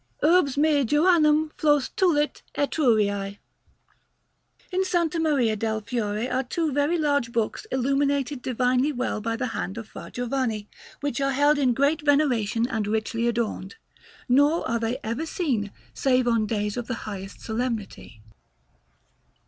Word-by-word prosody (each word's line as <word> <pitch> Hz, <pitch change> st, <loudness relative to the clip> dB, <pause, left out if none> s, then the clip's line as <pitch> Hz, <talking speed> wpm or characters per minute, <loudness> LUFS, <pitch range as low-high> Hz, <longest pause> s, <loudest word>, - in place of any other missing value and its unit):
URBS 305 Hz, -4 st, +4 dB
ME 295 Hz, -1 st, +3 dB
JOANNEM 305 Hz, +2 st, +3 dB
FLOS 295 Hz, -4 st, +3 dB
TULIT 330 Hz, -7 st, +1 dB
ETRURIÆ. 210 Hz, -9 st, +1 dB, 1.3 s
In 370 Hz, +1 st, +1 dB
S. 375 Hz, -1 st, -1 dB, 0.2 s
Maria 275 Hz, -9 st, +2 dB
del 220 Hz, +1 st, -1 dB
Fiore 215 Hz, 0 st, -2 dB
are 255 Hz, 0 st, 0 dB
two 310 Hz, +5 st, -2 dB
very 290 Hz, +5 st, +1 dB
large 285 Hz, -6 st, +1 dB
books 230 Hz, -, -2 dB
illuminated 275 Hz, +1 st, 0 dB
divinely 255 Hz, +3 st, +1 dB
well 250 Hz, -5 st, -2 dB
by 225 Hz, +1 st, -2 dB
the 250 Hz, +1 st, -2 dB
hand 195 Hz, -, -4 dB
of 225 Hz, -2 st, -6 dB
Fra -, -, -9 dB
Giovanni, 245 Hz, -4 st, -2 dB, 0.3 s
which 285 Hz, -2 st, -2 dB
are 275 Hz, 0 st, +1 dB
held 290 Hz, +2 st, +3 dB
in 255 Hz, -4 st, +2 dB
great 285 Hz, +4 st, +2 dB
veneration 245 Hz, -7 st, +2 dB
and 220 Hz, -5 st, -2 dB
richly 220 Hz, +2 st, -1 dB
adorned, 225 Hz, -5 st, -2 dB, 0.5 s
nor 285 Hz, +6 st, +3 dB
are 235 Hz, -, 0 dB
they 230 Hz, +2 st, -1 dB
ever 235 Hz, +9 st, -3 dB
seen 245 Hz, -, -1 dB, 0.2 s
save 255 Hz, -2 st, +2 dB
on 230 Hz, -2 st, +2 dB
days 210 Hz, 0 st, -2 dB
of 240 Hz, -1 st, -4 dB
the 255 Hz, -, -2 dB
highest 195 Hz, -2 st, -7 dB
solemnity. 220 Hz, -, -4 dB
255 Hz, 140 wpm, -25 LUFS, 225-290 Hz, 1.3 s, URBS